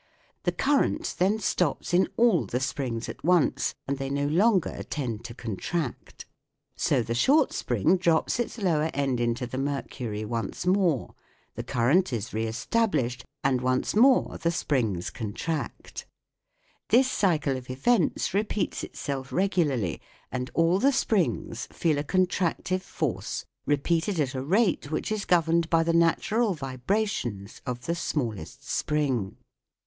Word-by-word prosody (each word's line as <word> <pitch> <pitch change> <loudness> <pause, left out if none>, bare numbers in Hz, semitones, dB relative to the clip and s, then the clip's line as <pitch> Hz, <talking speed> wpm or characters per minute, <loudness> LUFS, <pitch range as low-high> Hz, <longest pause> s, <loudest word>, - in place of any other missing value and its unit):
The - - +3
cur 280 0 +2
rent - - -1
then 195 +4 +3
stops 180 -6 -1
in 185 +2 +4
all 230 -9 +4
the 125 - -1
springs 130 -4 -2
at - - -8
once, 175 -1 +2
and 140 0 -2
they 135 0 -3
no 140 +1 0
longer 185 +6 +2
tend 120 -7 -3
to 115 -1 -7
contract. 125 - -4 0.5
So 120 - +1
the 115 - -3
short 275 - +3
spring 125 - +2
drops 170 +4 +1
its 240 - -2
lower 165 -7 +1
end 135 -3 0
into 120 +1 0
the 130 +2 -5
mercury 130 -6 -3
once 115 +9 -3
more, 180 - +2 0.4
the - - -4
current 140 +9 +2
is 110 -4 -3
re 110 +1 -1
established, 125 - 0 0.2
and 130 -2 +2
once 130 +6 0
more 255 +4 +4
the 170 - +1
springs 120 - -1
contract. 125 +5 -5 0.8
This 255 +5 +5
cycle 155 -8 +1
of 130 -1 -8
events 170 - +1
repeats 210 0 -1
itself 135 -2 -5
regularly, 155 - 0 0.3
and 125 +1 -3
all 165 +3 +3
the 275 +5 +4
springs 185 - 0
feel 155 -4 +1
a - - -1
contractive 185 +2 0
force - - -3 0.2
repeated 165 +6 +1
at 140 -3 0
a 130 - -3
rate 180 - +1
which 155 - -2
is 215 -2 -1
governed 170 -1 +2
by 165 -1 +4
the 165 0 +1
natural 190 +6 +2
vibrations 130 - -2
of 125 0 -4
the 170 - 0
smallest 120 - -4
spring. 135 -10 -1
150 Hz, 145 wpm, -27 LUFS, 125-185 Hz, 0.8 s, This